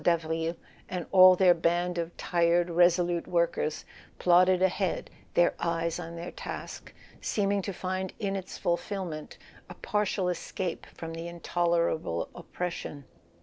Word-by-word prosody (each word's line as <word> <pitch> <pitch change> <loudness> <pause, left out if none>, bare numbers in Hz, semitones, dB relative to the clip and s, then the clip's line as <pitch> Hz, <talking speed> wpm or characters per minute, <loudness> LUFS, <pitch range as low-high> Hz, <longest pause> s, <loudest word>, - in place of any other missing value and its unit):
Davril, 165 0 +1 0.3
and 180 -3 -3
all 185 -1 +9
their 180 -1 +6
band 175 +1 0
of 170 0 -4
tired 170 0 +2
resolute 175 0 +3
workers 170 -3 0 0.3
—plodded 180 +1 +5
ahead, 190 -1 0 0.2
their 175 - +4
eyes 170 0 -1
on 170 -1 -7
their 170 +1 -6
task, - - -7 0.3
seeming 200 -1 0
to 200 - -4
find 185 0 -3
in 195 -1 -2
its 190 -1 -6
fulfillment 175 -3 -3 0.3
a - - -9
partial 205 -2 -1
escape 180 0 -3
from 165 0 -7
the 165 +1 -5
in¬ 170 0 -8
tolerable 170 - 0
oppression. 165 -5 -5
175 Hz, 135 wpm, -29 LUFS, 170-185 Hz, 0.3 s, all